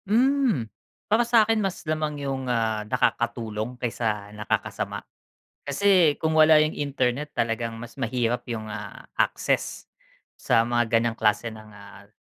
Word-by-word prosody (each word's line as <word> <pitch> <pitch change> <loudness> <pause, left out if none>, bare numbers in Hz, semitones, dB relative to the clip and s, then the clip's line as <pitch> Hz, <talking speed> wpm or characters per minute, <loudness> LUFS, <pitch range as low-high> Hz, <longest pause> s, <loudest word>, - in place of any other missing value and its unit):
Hmm. 245 - +2 0.4
Para 220 +3 +3
sa 230 -2 +5
akin, 225 0 +1
mas 195 -4 -3
lamang 155 -2 -2
yung, 135 -2 -3
ah, 110 -3 0
nakakatulong 120 -1 -1
kaysa 110 -4 -3
nakakasama. 105 0 -3 0.6
Kasi 170 0 +4
kung 160 - 0
wala 155 0 +7
yung 155 - -2
internet 140 0 -1
talagang 115 0 -1
mas 120 0 -10
mahirap 120 -1 -1
yung, 110 -2 -5
ah, 105 - -8 0.2
access - - 0 0.5
sa 115 - +3
mga 120 0 +1
ganyang 115 0 +2
klase 110 +2 +1
ng, 110 -1 -12
ah, 100 0 -14
120 Hz, 135 wpm, -25 LUFS, 115-155 Hz, 0.6 s, wala